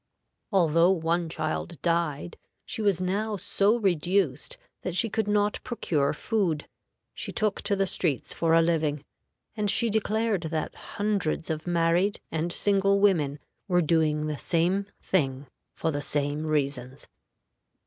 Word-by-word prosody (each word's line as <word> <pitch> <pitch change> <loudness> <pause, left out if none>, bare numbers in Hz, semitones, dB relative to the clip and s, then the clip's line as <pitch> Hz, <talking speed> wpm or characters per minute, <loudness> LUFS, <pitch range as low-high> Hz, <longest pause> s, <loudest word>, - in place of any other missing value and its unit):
Although 170 -3 +4
one 170 -2 +1
child 170 -1 -3
died, 170 -2 0 0.3
she - - -4
was 200 -4 +2
now 205 +4 -1
so 205 +4 +2
reduced 180 - 0 0.2
that 180 - -4
she 225 +2 +1
could 220 -1 0
not 205 0 +1
procure 150 - 0
food. 175 -4 -1 0.5
She - - -6
took 215 -2 0
to 200 - 0
the 195 0 +1
streets 170 -7 -1
for 165 -1 +2
a 165 - +5
living, 155 -3 0 0.5
and 210 -2 0
she 225 +3 +3
declared 220 -1 +1
that 155 -1 -2
hundreds 200 -7 -2
of 155 +1 -4
married 175 +4 +2
and 165 +2 -1
single 200 +1 +2
women 160 -9 +2 0.3
were 180 -2 +3
doing 155 -1 +2
the 150 -2 -3
same 180 +4 +1 0.2
thing 135 -6 0 0.3
for 160 - -1
the 145 -1 -2
same 145 +2 -1
reasons. 140 -3 -2
170 Hz, 140 wpm, -27 LUFS, 155-200 Hz, 0.5 s, a